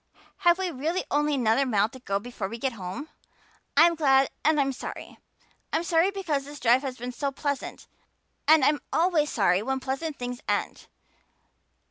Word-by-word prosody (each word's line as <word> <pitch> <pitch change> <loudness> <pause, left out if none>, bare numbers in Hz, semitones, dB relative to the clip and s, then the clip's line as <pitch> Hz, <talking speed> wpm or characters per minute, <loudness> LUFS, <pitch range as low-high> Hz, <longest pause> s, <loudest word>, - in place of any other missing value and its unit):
Have 350 -3 +4
we 375 -2 -2
really 320 +6 -2
only 295 0 +2
another 240 0 +2
mile 215 -6 +2
to 260 - -12
go 200 -5 -1
before 210 -2 -5
we 230 - -6
get 260 +1 -2
home? 200 - -7 0.7
I'm 335 +3 +7
glad 270 -4 +3
and 310 0 +3
I'm 275 -1 +1
sorry. 255 - -8 0.5
I'm 320 - 0
sorry 335 +2 +3
because 350 -8 -2
this 290 0 -10
drive 245 +2 +4
has 265 -3 -5
been 245 +2 -5
so 275 +3 -2
pleasant 285 0 -4 0.6
and 310 -3 +6
I'm 295 +1 +2
always 325 -3 +2
sorry 190 -3 +2
when 265 +4 -2
pleasant 275 +4 -4
things 245 0 -5
end. - - -2
275 Hz, 170 wpm, -26 LUFS, 245-315 Hz, 0.7 s, I'm